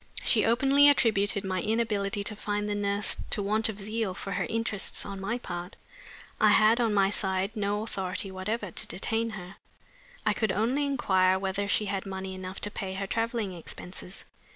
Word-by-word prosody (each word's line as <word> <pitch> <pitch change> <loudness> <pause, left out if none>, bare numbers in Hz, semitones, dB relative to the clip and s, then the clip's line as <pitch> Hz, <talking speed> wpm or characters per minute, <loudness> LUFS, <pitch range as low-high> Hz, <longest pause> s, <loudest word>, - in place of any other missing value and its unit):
She 215 -4 +4
openly 275 +5 +5
attributed 205 -7 +3
my 185 -2 -2
inability 210 -2 -1
to 215 +1 -3
find 205 0 -2
the 210 - -1
nurse 205 0 +1
to 205 - +1
want 215 +3 +1
of 210 -1 -6
zeal 215 -1 -2
for 195 - -6
her 180 -1 -1
interests 225 -3 +3
on 195 -1 -6
my 215 +5 -2
part. 175 -4 -6 0.6
I - - +5
had, 225 +3 +5
on 230 -2 +2
my 195 -1 +3
side, 190 -1 -1
no 205 0 -1
authority 190 -2 -4
whatever 205 +1 -3
to - - -1
detain 225 +4 -1
her. 180 +1 -10 0.7
I 215 - +3
could 215 -1 0
only 235 +9 +1
inquire 190 -9 +2
whether 195 +1 -2
she 210 +1 +2
had 195 -1 -3
money 190 0 -5
enough 185 0 -7
to 210 - -2
pay 190 -2 -4
her 195 +1 -3
traveling 225 -1 -2
expenses. 180 +2 -7
205 Hz, 180 wpm, -28 LUFS, 190-220 Hz, 0.7 s, openly